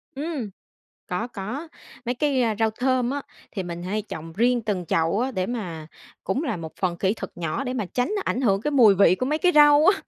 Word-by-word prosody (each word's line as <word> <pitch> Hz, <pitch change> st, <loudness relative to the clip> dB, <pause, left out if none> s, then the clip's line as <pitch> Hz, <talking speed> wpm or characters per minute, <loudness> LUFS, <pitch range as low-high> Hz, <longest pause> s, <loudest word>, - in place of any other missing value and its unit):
Ừm, 285 Hz, -6 st, -3 dB, 0.6 s
có, 185 Hz, +6 st, -2 dB
có. 245 Hz, -, -6 dB, 0.4 s
Mấy 245 Hz, +1 st, -1 dB
cái 270 Hz, 0 st, +1 dB, 0.2 s
rau 225 Hz, -1 st, +2 dB
thơm 250 Hz, +2 st, 0 dB
á, 285 Hz, 0 st, -2 dB, 0.3 s
thì 195 Hz, -, -3 dB
mình 175 Hz, -1 st, -6 dB
hay 205 Hz, +4 st, -2 dB
trồng 165 Hz, -5 st, -8 dB
riêng 240 Hz, +5 st, +2 dB
từng 200 Hz, -5 st, -2 dB
chậu 165 Hz, +6 st, +1 dB
á, 260 Hz, +2 st, 0 dB
để 185 Hz, -5 st, -2 dB
mà 180 Hz, -10 st, -5 dB, 0.4 s
cũng 225 Hz, +10 st, -1 dB
là 265 Hz, -, -1 dB
một 160 Hz, -2 st, -7 dB
phần 180 Hz, -2 st, 0 dB
kỹ 190 Hz, +3 st, +1 dB
thuật 195 Hz, -4 st, -7 dB
nhỏ 170 Hz, -, -2 dB
để 255 Hz, -1 st, -3 dB
mà 220 Hz, -6 st, -2 dB
tránh 245 Hz, -, -1 dB
ảnh 250 Hz, -, -1 dB
hưởng 200 Hz, -6 st, +2 dB
cái 295 Hz, -, -1 dB
mùi 235 Hz, -8 st, +6 dB
vị 185 Hz, -2 st, +5 dB
của 255 Hz, -, -2 dB
mấy 305 Hz, +3 st, 0 dB
cái 360 Hz, 0 st, +3 dB
rau 295 Hz, +1 st, +7 dB
á. 390 Hz, +1 st, +4 dB
225 Hz, 225 wpm, -24 LUFS, 185-265 Hz, 0.6 s, rau